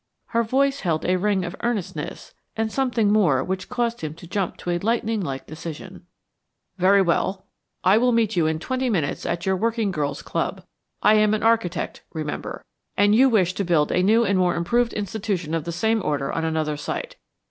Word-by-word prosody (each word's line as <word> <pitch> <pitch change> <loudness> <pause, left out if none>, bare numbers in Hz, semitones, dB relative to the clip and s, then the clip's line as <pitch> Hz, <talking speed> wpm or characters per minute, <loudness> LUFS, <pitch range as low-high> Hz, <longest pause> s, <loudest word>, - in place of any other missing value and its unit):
Her 230 - +2
voice 275 +4 +1
held 165 -4 -1
a 185 - +2
ring 195 -1 +1
of 175 +2 -5
earnestness 235 -6 -4 0.2
and 220 0 -1
something 235 -6 +1
more 165 -12 +3
which 185 +3 -4
caused 240 -1 -1
him 155 -1 -5
to 170 - -12
jump 190 +1 -2
to 175 - -4
a 175 - 0
lightning 225 +1 0
like 135 -6 -4
decision. 155 0 -9 0.7
"Very 195 +2 +5
well. 190 +2 0 0.4
I 190 +4 +5
will 250 +1 +3
meet 225 -3 +1
you 165 -3 +2
in 160 0 0
twenty 255 +9 -2
minutes 165 -10 -1
at 170 0 -2
your 190 0 +2
Working 225 +1 0
Girls' 150 -4 -3
Club. - - -3 0.4
I 210 - +6
am 215 0 +4
an 215 - -3
architect, 225 -6 0
remember, 155 -2 -5 0.3
and 205 +1 +4
you 260 +4 +6
wish 185 -6 +2
to 200 - -2
build 165 -5 +2
a 180 - +2
new 220 +5 +4
and 195 -2 +2
more 180 -1 +2
improved 235 +8 +1
institution 200 -5 -3
of 165 -1 -1
the 170 - -3
same 220 +6 +1
order 140 -2 -1
on 165 - -2
another 155 -2 -1
site. - - -5
195 Hz, 195 wpm, -23 LUFS, 170-225 Hz, 0.7 s, I